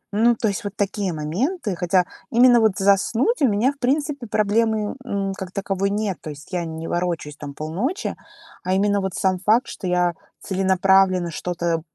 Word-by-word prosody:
Ну, 235 +3 +4
то 225 - -1
есть 200 -2 -2
вот 205 -1 -5
такие 200 -1 -1
моменты. 200 - -2
Хотя 180 +1 +2 0.3
именно 245 0 +6
вот 220 -3 +3
заснуть 220 - +2
у 275 - +5
меня, 220 +5 +2
в 280 - -28
принципе, 280 0 -1
проблемы, 215 0 +1
м, 200 -4 -2
ну, - - -3
как 190 -1 -7
таковой 195 0 -1
нет, 205 -2 -1
то - - -7
есть 145 +5 -13
я 175 -1 -1
не 160 0 -6
ворочусь, 170 -4 -2
там, 145 -1 -7
полночи, 190 - -3 0.5
а 185 - 0
именно 200 +1 +2
вот 190 -1 -3
сам 185 -1 +1
факт, 220 +6 +3
что 185 - -6
я 180 -1 +2 0.3
целенаправленно 190 -1 +2
что-то 170 0 -2
195 Hz, 180 wpm, -22 LUFS, 180-220 Hz, 0.5 s, именно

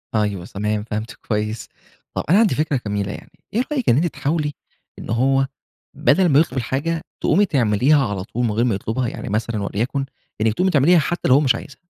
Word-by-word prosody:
أيوه 105 -4 0
تمام، 105 +2 -2
فهمتِك 110 +1 -5
كويّس، 105 +1 -2 0.5
طب - - -1
أنا 185 +6 +6
عندي 225 -3 +3
فكرة 150 -3 0
جميله 100 0 -2
يعني، - - -10 0.2
إيه 235 +4 +2
رأيِك 265 -6 0
إن - - +5
أنتِ 155 +6 +2
تحاولي 150 -1 -2 0.5
إن - - -9
هو 135 +3 +2 0.5
بدل 175 +4 +3
ما 140 -1 +5
يطلب 155 -4 0
الحاجة، 140 +7 -1 0.2
تقومي 200 +5 +3
تعمليها 135 - +3
على 100 -3 -3
طول 120 +4 -2
من 115 - 0
غير 115 +3 +1
ما 115 -5 +1
يطلبها. 115 +5 -2
يعني 115 - -6
مثلًا 110 0 -1
وليكن 125 +7 -2 0.4
إنّك 110 0 +2
تقومي 185 - +1
تعمليها 160 +4 +5
حتّى 175 +4 -1
لو 125 - +5
هو - - +6
مش 135 -4 +3
عايزها، 140 -4 -10
130 Hz, 200 wpm, -21 LUFS, 105-150 Hz, 0.5 s, أنا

